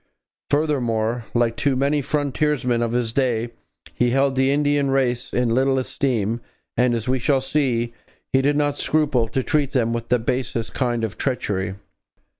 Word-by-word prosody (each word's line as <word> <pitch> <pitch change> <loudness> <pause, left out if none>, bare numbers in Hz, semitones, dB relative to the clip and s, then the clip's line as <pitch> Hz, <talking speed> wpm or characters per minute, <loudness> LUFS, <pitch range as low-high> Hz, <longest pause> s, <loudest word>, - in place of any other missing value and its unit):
Furthermore, 120 -6 0
like 120 -1 +2
too 140 +1 +1
many 140 +3 +1
frontiersmen 140 -3 0
of 115 -1 0
his 120 -2 0
day, 120 -3 0 0.4
he 120 - +1
held 135 +2 +2
the 135 +1 +3
Indian 145 -1 +2
race 130 -2 0
in 120 -2 +1
little 135 +2 +2
esteem 125 -4 -1 0.3
and, 125 -1 +2
as 115 +1 -3
we 130 +1 +1
shall 135 +3 +2
see, 130 -4 0 0.4
he 135 - +4
did 145 +2 +2
not 145 -1 +1
scruple 145 -7 +1
to 130 +4 -2
treat 145 -2 0
them 115 -3 +1
with 115 0 -4
the 125 - +4
basest 120 -1 -2
kind 120 -3 -1
of 110 -1 -4
treachery. 100 -8 -1
130 Hz, 165 wpm, -22 LUFS, 115-140 Hz, 0.4 s, he